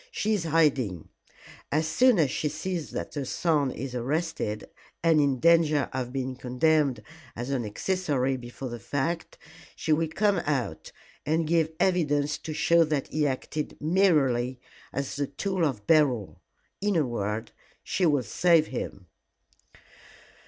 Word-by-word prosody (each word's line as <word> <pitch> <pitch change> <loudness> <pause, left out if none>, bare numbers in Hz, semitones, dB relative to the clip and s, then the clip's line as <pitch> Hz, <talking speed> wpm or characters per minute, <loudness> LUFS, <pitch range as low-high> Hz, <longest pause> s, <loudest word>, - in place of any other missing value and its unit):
She 215 +1 -1
is 190 -6 -1
hiding. 135 - +1 0.6
As 155 +2 +1
soon 250 +5 +4
as 150 -6 +3
she 150 - -1
sees 165 +2 -4
that - - -5
her 145 - -3
son 150 0 +1
is 130 +1 -6
arrested, 125 -4 -2 0.4
and 165 -2 +5
in 140 -3 +1
danger 160 -2 +4
of 125 -2 -3
being 130 -1 -3
condemned 130 -1 +1 0.3
as 120 +3 -4
an 130 -3 0
accessory 135 - -1
before 125 +1 -7
the 120 0 -6
fact, 150 - -3 0.4
she 155 - 0
will 160 +1 +1
come 200 +5 +1
out 130 - -2 0.3
and 160 +2 +1
give 160 0 +2
evidence 150 -6 +1
to 160 - -6
show 170 +2 +4
that 150 -3 -2
he 150 -1 +1
acted 145 +3 -4
merely 145 -8 +2 0.3
as 140 +1 -4
the 140 -1 -1
tool 185 +6 -2
of 125 -10 -1
Beryl. 135 - +2 0.4
In 205 -1 +1
a 155 -4 +3
word, 110 -2 -3 0.3
she 180 - +1
will 145 -4 +2
save 170 0 +3
him." 100 -6 -5
150 Hz, 145 wpm, -27 LUFS, 130-165 Hz, 0.6 s, and